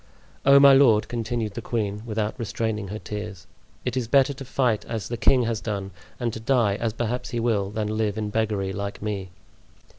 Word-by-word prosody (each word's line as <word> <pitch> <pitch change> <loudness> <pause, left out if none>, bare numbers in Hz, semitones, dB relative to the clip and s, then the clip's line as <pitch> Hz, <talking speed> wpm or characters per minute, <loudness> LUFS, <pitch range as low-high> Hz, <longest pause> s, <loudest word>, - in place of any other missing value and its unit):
Oh, 140 0 +9
my 140 0 +8
lord!" 115 -6 +5
continued 115 -2 -3
the 120 - -5
queen, 105 -3 -2
without 110 -1 -1
restraining 110 -2 -2
her 105 +3 -5
tears, 105 -2 -7 0.4
"it 125 0 -1
is 125 -3 -1
better 135 +3 +4
to 135 0 -8
fight 125 -4 0
as 110 -4 -4
the 120 - -2
king 125 +2 +3
has 115 -2 -2
done, 100 -3 -4 0.3
and 120 -3 -1
to - - -5
die, 115 -3 +2
as 115 0 -1
perhaps 120 +2 -2
he 120 - -2
will, 110 -4 +1
than 105 0 -2
live 110 -2 0
in 105 -1 -2
beggary 105 -3 -1
like 100 +1 -5
me." 100 -3 -3
110 Hz, 200 wpm, -25 LUFS, 105-120 Hz, 0.4 s, Oh